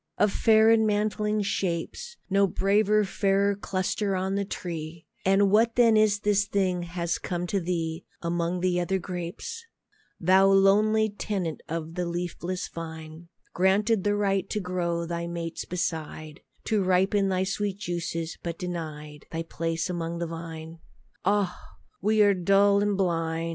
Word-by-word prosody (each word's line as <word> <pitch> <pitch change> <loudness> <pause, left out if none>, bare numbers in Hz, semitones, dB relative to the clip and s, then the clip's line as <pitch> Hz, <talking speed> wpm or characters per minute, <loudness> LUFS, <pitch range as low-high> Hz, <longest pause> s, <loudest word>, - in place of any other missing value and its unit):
Of 210 - +3
fair 220 0 +5
and 220 -1 +4
mantling 210 0 0
shapes, 195 - -3
No 200 0 +3
braver, 210 +2 +2
fairer 200 +1 +1
cluster 195 +1 -1
on 190 +1 -1
the 200 0 0
tree; 165 -4 -6 0.2
And 195 +1 +4
what 225 +2 +4
then 235 -2 +5
is 215 -1 +3
this 205 -1 +2
thing 185 -3 0
has 170 0 -3
come 175 -1 -3
to 195 +2 0
thee 165 -1 -3 0.2
Among 170 +1 -1
the 180 -1 +1
other 190 +2 0
grapes, 180 - -6 0.6
Thou 190 +3 +5
lonely 205 +3 +4
tenant 195 -5 -3
of 165 0 -4
the 180 0 -2
leafless 175 +1 -3
vine, 160 0 -8 0.3
Granted 195 +3 +2
the 205 0 +1
right 195 -2 0
to 210 - -1
grow 175 -3 -2
thy 170 0 -3
mates 170 -1 -5
beside, 155 -3 -4 0.2
To 215 -2 +1
ripen 190 +2 +2
thy 185 0 +1
sweet 195 0 -2
juices, 170 -3 -4
but 170 -1 -4
denied 155 -4 -6
Thy 165 0 -3
place 165 0 -2
among 170 -2 -3
the 170 - -2
wine? 165 0 -8 0.5
Ah! 200 -1 -1 0.3
we 215 0 +4
are 205 -1 +5
dull 195 +2 +4
and 205 -1 +1
blind. 165 -3 0
185 Hz, 150 wpm, -27 LUFS, 170-200 Hz, 0.6 s, fair